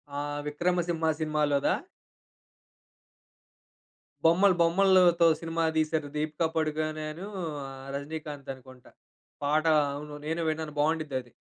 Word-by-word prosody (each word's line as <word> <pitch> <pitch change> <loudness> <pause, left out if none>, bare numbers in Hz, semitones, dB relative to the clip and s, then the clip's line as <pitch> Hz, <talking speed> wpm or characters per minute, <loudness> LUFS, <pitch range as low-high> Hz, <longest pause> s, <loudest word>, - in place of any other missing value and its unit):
ఆహ్ 145 0 -3
విక్రమ 175 +5 0
సింహ 165 -2 0
సినిమాలోదా? 150 -2 +1 2.5
బొమ్మలు 180 +3 +5
బొమ్మలతో 175 0 +5
సినిమా 165 0 -2
దీశారు 155 -1 0
దీపిక 155 +2 -1
పడుకొనే 155 0 -1
అను, 170 +5 -8 0.4
ఆహ్ 135 0 -9
రజినీకాంత్ 145 -1 -6
అనుకుంట. 130 -1 -15 0.6
పాట 155 +2 +2 0.3
అవును. 145 +1 -7
నేను 160 +2 -1
విన్నాను. 155 -1 -3
బాగుండిద్దది. 145 -5 0
155 Hz, 100 wpm, -28 LUFS, 145-165 Hz, 2.5 s, బొమ్మలు